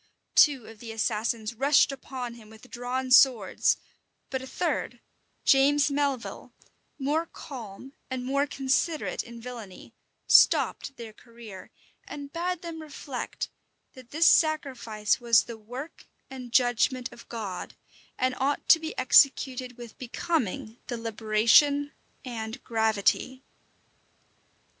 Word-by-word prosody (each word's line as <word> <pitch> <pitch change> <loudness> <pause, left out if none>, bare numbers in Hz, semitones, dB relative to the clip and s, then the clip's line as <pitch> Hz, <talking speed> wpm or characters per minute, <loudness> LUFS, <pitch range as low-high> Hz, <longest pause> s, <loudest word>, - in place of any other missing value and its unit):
Two 275 -6 +5
of 225 -1 -13
the 230 0 -8
assassins 220 0 -1
rushed 275 +4 +3
upon 255 -3 -6
him 225 -3 -15
with 220 +3 -16
drawn 255 +1 -3
swords; 250 -7 +5 0.5
but 265 -1 -2
a 260 - -8
third, - - -2 0.5
James 285 +2 +4
Melvil, 280 -3 -2 0.4
more 305 +4 -1
calm 255 -1 -10 0.2
and 255 -1 -4
more 280 +2 +1
considerate 275 +4 -1
in 235 -1 -11
villany, 230 -6 -10 0.3
stopped 270 - +4
their 225 -2 -9
career, 230 -4 -12 0.4
and 285 -1 -8
bade 355 +1 -3
them 330 -2 -6
reflect, 285 -4 -6 0.4
that 255 -2 -14
this 320 +3 +2
sacrifice 260 -12 +2
was 235 -2 +4
the 235 - -8
work 250 +9 -9 0.2
and 255 -2 -8
judgment 245 +1 +2
of 235 - -15
God, 215 -6 -6 0.4
and 255 0 +1
ought 280 +2 -1
to 325 - +8
be 320 0 -6
executed 255 -1 +3
with 240 -2 -11
becoming 245 - -3
deliberation 230 +5 +3 0.3
and 225 0 -6
gravity. 220 +3 0
255 Hz, 120 wpm, -27 LUFS, 230-280 Hz, 0.5 s, to